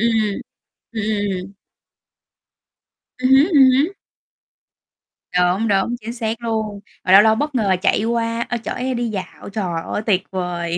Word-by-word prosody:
ừm. 215 -3 0 0.5
Ừm, 220 -2 -3 0.4
ừm. 190 +2 -10 1.7
Ừm 255 0 0
hứm, 270 +3 +7
ừm 275 -5 +7
hứm. 280 +7 +2 1.5
Đúng, 180 +5 +2
đúng, 200 +4 +1
chính 230 +2 -6
xác 225 -1 -3
luôn. 220 -3 -2 0.2
Mà 185 - 0
lâu 195 +2 +10
lâu 220 0 +4
bất 295 +3 -2
ngờ 200 -6 +2
chạy 205 - +2
qua, 230 0 -1
ơ, 240 - -1
chở - - -3
em 255 0 -2
đi 240 -1 -1
dạo. 200 -1 -7
Trời 180 -5 -3
ơi, - - -2
tuyệt 190 -4 +2
vời! 175 -2 -2
220 Hz, 155 wpm, -20 LUFS, 195-240 Hz, 1.7 s, lâu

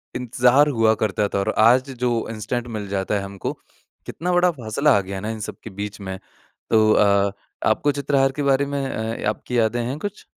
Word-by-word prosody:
इंतज़ार 125 +3 +3
हुआ 115 -4 +3
करता 105 -1 0
था - - -1
और 100 - 0
आज 125 +5 +5
जो 120 -2 0
इंस्टेंट 115 +2 -4
मिल 105 -1 -5
जाता 95 +1 -1
है 100 - 0
हमको, 100 0 -5 0.5
कितना 180 +2 -3
बड़ा 175 0 +4
फ़ासला 140 +1 0
आ - - +1
गया 100 +1 -7
है 95 - -5
ना 110 - -4
इन 110 - -6
सब 105 - -6
के 110 - -7
बीच 105 +2 -6
में। 95 -1 -5 0.5
तो 110 -1 +4
अ, 100 -1 +3 0.3
आपको 145 - +2
चित्रहार 140 -1 +1
के 145 +1 -4
बारे 140 0 +2
में 140 0 -3
अ, 110 -2 -3
आपकी 120 +3 -3
यादें 115 +2 +1
हैं 135 +4 -3
कुछ? 205 +2 -6
115 Hz, 210 wpm, -22 LUFS, 105-135 Hz, 0.5 s, आज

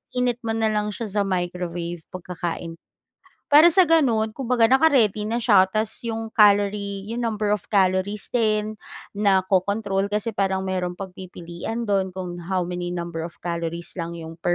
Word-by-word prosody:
iinit 250 -1 0
mo 225 -2 -3
na 220 -1 +1
lang 210 0 0
siya 210 -1 -3
sa - - +4
microwave 175 -2 -3
pagkakain. 170 -2 -6 0.7
Para 300 +3 +8
sa 345 +2 +7
ganun 260 -10 +3
kumbaga 235 -1 +1
naka-ready 255 -8 +3
na 235 +2 -2
siya 200 -5 +5
ta's 215 +3 -1 0.2
yung 225 -1 -4
calorie 200 -1 +3
yung 235 - -3
number 215 -2 -1
of 210 -3 -1
calories 195 +1 +1
din 215 -2 0 0.3
naco-control, 195 0 +1
kasi 210 +2 -1
parang 190 -2 -1
merong 185 -2 -2
pagpipilian 180 +3 -7
dun 195 -4 -1
kung 180 -2 -6
how 185 0 0
many 175 0 -4
number 170 -2 -4
of 170 - -12
calories 170 0 -3
lang 170 0 -4
yung 165 0 -9
per 175 +1 0
200 Hz, 155 wpm, -23 LUFS, 180-220 Hz, 0.7 s, Para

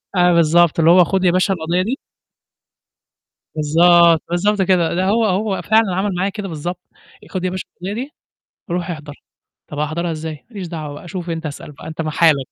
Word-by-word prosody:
آه، 180 0 +4
بالضبط، 170 0 +4
اللي 165 +1 +5
هو 180 0 +7
خُد 190 +1 -1
يا 175 - +4
باشا 185 +2 +2
القضية 175 +1 -1
دي 240 +8 -2 1.6
بالضبط، 165 +2 +5
بالضبط، 200 +4 +1
كده 180 -3 +2
ده 185 - 0
هو 220 +4 +2
هو 200 0 0
فعلًا 220 -4 +2
عمل 190 -1 -1
معايا 190 +3 0
كده 205 0 -6
بالضبط 175 +2 -5 0.4
آآ، - - -15
"خُد 185 -1 -4
يا 185 - 0
باشا 185 0 -5
القضية 190 +3 -5
دي 260 +6 -5 0.6
روح 175 0 -2
أحضر." 150 -3 -8 0.5
"طَب 150 - -7
أحضرها 165 +3 -2
إزاي؟" 155 -1 -6
"ما 235 - -22
ليش 190 -4 -6
دعوة 155 -2 -7
شوف 175 -1 -6
أنت، 165 0 -4
أسأل 150 0 -7
بقى 150 - -12
أنت 160 +1 -5
في 155 - -2
حالك." 150 -4 +3
175 Hz, 195 wpm, -19 LUFS, 160-190 Hz, 1.6 s, هو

